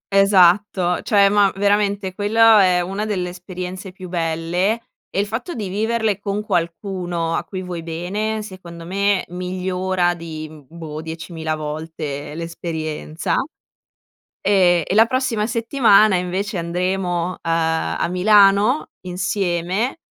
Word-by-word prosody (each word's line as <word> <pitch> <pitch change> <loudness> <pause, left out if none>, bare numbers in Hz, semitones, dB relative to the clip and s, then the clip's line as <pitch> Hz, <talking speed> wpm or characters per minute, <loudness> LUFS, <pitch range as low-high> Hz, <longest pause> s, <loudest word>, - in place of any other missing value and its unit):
Esatto. 190 -2 +4
Cioè, 200 -3 +4
ma 200 -1 +4
veramente 200 -1 +1
quello 220 +2 +5
è 180 -2 +4
una 195 +4 -3
delle 190 -4 -2
esperienze 180 +1 -7
più 185 -1 -10
belle 170 +5 0 0.3
e - - -2
il 200 - +2
fatto 230 - -5
di 210 -5 -4
viverle 220 +1 0
con 205 +1 -3
qualcuno 175 -2 -2
a - - -1
cui 185 -1 -6
vuoi 180 -2 -5
bene 195 +7 -3
secondo 175 -4 -10
me 200 +2 +1
migliora 180 0 -1
di, 160 -2 -7
mhmm, 150 -4 -15
boh, 160 -2 -7
10.000 160 0 -5
volte 150 -1 -5
l'esperienza. 160 -1 -3 1.1
Ehm, 180 -4 +4
e 185 - -2
la 220 +2 +6
prossima 250 -4 0
settimana 230 -3 +4
invece 185 +2 -2
andremo, 175 0 -1
uhm, - - -8
a 165 -1 0
Milano 200 +6 +4 0.2
insieme, 185 - -1
185 Hz, 125 wpm, -20 LUFS, 170-205 Hz, 1.1 s, la